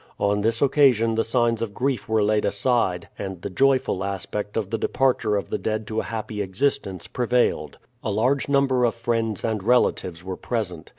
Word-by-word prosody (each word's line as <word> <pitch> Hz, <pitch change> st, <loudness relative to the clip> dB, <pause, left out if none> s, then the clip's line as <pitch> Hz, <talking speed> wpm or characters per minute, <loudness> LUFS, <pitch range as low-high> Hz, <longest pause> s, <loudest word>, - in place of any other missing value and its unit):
On 100 Hz, 0 st, +1 dB
this 115 Hz, +4 st, +1 dB
occasion 130 Hz, -5 st, +4 dB
the 115 Hz, 0 st, +1 dB
signs 115 Hz, -1 st, +1 dB
of 105 Hz, -3 st, -4 dB
grief 130 Hz, -4 st, -1 dB
were 110 Hz, -1 st, +3 dB
laid 105 Hz, 0 st, +2 dB
aside, 115 Hz, -9 st, 0 dB
and 95 Hz, -3 st, -5 dB
the 100 Hz, -, -4 dB
joyful 130 Hz, -3 st, +2 dB
aspect 100 Hz, +2 st, -4 dB
of 105 Hz, -4 st, -2 dB
the 115 Hz, -, 0 dB
departure 125 Hz, -5 st, +1 dB
of 100 Hz, -4 st, -3 dB
the -, -, -1 dB
dead 110 Hz, 0 st, -2 dB
to 110 Hz, 0 st, -1 dB
a -, -, -1 dB
happy 110 Hz, -2 st, -4 dB
existence 95 Hz, -, -1 dB
prevailed. 125 Hz, 0 st, 0 dB, 0.3 s
A -, -, -2 dB
large 130 Hz, +6 st, +1 dB
number 135 Hz, -3 st, +3 dB
of 120 Hz, -1 st, +2 dB
friends 115 Hz, -3 st, -1 dB
and 110 Hz, -3 st, -1 dB
relatives 95 Hz, -6 st, +1 dB
were 95 Hz, 0 st, -5 dB
present. 90 Hz, -9 st, -4 dB
110 Hz, 185 wpm, -24 LUFS, 100-125 Hz, 0.3 s, occasion